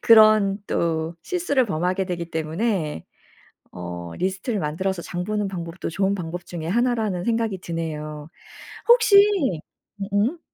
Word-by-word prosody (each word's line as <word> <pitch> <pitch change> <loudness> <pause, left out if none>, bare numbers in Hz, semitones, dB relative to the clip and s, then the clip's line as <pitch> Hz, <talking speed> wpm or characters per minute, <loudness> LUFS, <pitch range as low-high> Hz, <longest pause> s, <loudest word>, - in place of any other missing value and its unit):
그런 215 -3 +6
또 165 0 -1
실수를 340 -8 +1
범하게 185 0 -1
되기 170 -2 -4
때문에 160 - -2 0.7
어 85 -1 -6
리스트를 190 +4 -1
만들어서 170 +4 -2
장 175 +1 -4
보는 210 -1 -1
방법도 175 -2 -5
좋은 195 +4 +1
방법 175 -2 -5
중에 165 -2 -5
하나라는 220 -4 +1
생각이 225 -4 0
드네요. 155 -3 -5 0.6
혹시 470 -3 +6 0.8
음 195 - -3
음? 230 +12 +1
185 Hz, 280 characters per minute, -23 LUFS, 165-215 Hz, 0.8 s, 그런